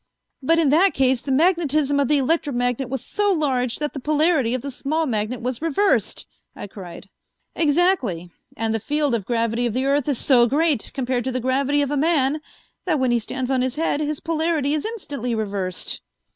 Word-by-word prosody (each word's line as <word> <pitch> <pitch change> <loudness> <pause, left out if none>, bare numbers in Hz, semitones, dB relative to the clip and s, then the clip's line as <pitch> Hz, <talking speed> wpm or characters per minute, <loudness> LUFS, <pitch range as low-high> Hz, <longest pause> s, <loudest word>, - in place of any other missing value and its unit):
"But 330 +5 +2
in 320 -4 +3
that 360 +6 +4
case 260 -2 +2
the 275 - -4
magnetism 305 -2 +2
of 280 - +2
the 295 - +3
electromagnet 260 -4 0
was 260 -1 -4
so 415 -1 +1
large 260 -8 0
that 295 -1 -3
the 275 - -5
polarity 300 -3 +2
of 255 - -5
the 280 - -4
small 310 +5 -1
magnet 225 -1 -2
was 250 +1 -3
reversed!" 330 +6 +1 0.3
I - - -7
cried. 190 -2 -10 0.5
"Exactly, 290 - +1 0.3
and 225 -1 -1
the 225 - 0
field 290 +4 0
of 215 -5 -2
gravity 230 0 0
of 230 - -3
the 260 +3 -1
earth 280 +1 +1
is 275 - 0
so 240 -2 +4
great 295 -1 +1
compared 255 -2 -1
to 260 - -1
the 255 - -2
gravity 275 +3 +1
of 280 - -3
a 290 - 0
man 300 -1 +1 0.4
that 320 -6 +1
when 260 -2 +1
he 240 - +2
stands 255 +3 -4
on 260 -1 +1
his 260 0 -1
head, 305 -2 0
his 300 -1 -2
polarity 320 -3 0
is 305 - -1
instantly 285 - -4
reversed." 200 -4 -3
270 Hz, 200 wpm, -22 LUFS, 245-305 Hz, 0.5 s, that